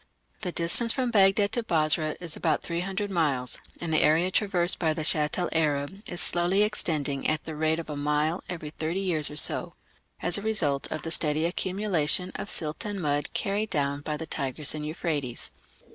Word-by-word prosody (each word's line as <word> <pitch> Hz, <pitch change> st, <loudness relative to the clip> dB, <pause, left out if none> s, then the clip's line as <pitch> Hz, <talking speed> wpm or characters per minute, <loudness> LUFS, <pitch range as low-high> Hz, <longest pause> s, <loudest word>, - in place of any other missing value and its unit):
The 180 Hz, -4 st, -3 dB
distance 175 Hz, +8 st, +5 dB
from 255 Hz, -3 st, -1 dB
Baghdad 200 Hz, -1 st, +4 dB
to 240 Hz, -, -1 dB
Basra 155 Hz, -6 st, +2 dB
is 165 Hz, -2 st, -1 dB
about -, -, 0 dB
300 190 Hz, +4 st, -3 dB
miles, 140 Hz, -8 st, 0 dB, 0.2 s
and 165 Hz, -2 st, -3 dB
the 155 Hz, -, +3 dB
area 165 Hz, +4 st, +3 dB
traversed 185 Hz, -3 st, +2 dB
by 160 Hz, -3 st, +1 dB
the 155 Hz, -, -3 dB
Shatt 150 Hz, -1 st, +3 dB
el 180 Hz, -1 st, 0 dB
Arab 150 Hz, +3 st, -1 dB
is 175 Hz, -, -5 dB
slowly 180 Hz, +3 st, +2 dB
extending 150 Hz, -9 st, 0 dB
at 155 Hz, 0 st, -1 dB
the 160 Hz, -, -6 dB
rate 155 Hz, +1 st, +1 dB
of 165 Hz, -, -6 dB
a 150 Hz, -, -5 dB
mile 150 Hz, +3 st, 0 dB
every 160 Hz, -4 st, -5 dB
thirty 160 Hz, +4 st, -3 dB
years 165 Hz, -6 st, +2 dB
or 150 Hz, -, -9 dB
so, 150 Hz, -, +1 dB, 0.5 s
as 175 Hz, +4 st, -1 dB
a -, -, -8 dB
result 160 Hz, -11 st, 0 dB
of 155 Hz, -, -4 dB
the 165 Hz, -, -5 dB
steady 155 Hz, -1 st, +1 dB
accumulation 180 Hz, -1 st, 0 dB
of -, -, -5 dB
silt 155 Hz, +3 st, -1 dB
and 205 Hz, -2 st, -3 dB
mud 145 Hz, -3 st, -1 dB
carried 205 Hz, +2 st, -1 dB
down 140 Hz, -5 st, -1 dB
by 150 Hz, +1 st, -3 dB
the 160 Hz, -, -6 dB
Tigris 140 Hz, -1 st, -2 dB
and 150 Hz, -1 st, -4 dB
Euphrates. 150 Hz, -6 st, -3 dB
165 Hz, 190 wpm, -27 LUFS, 150-185 Hz, 0.5 s, distance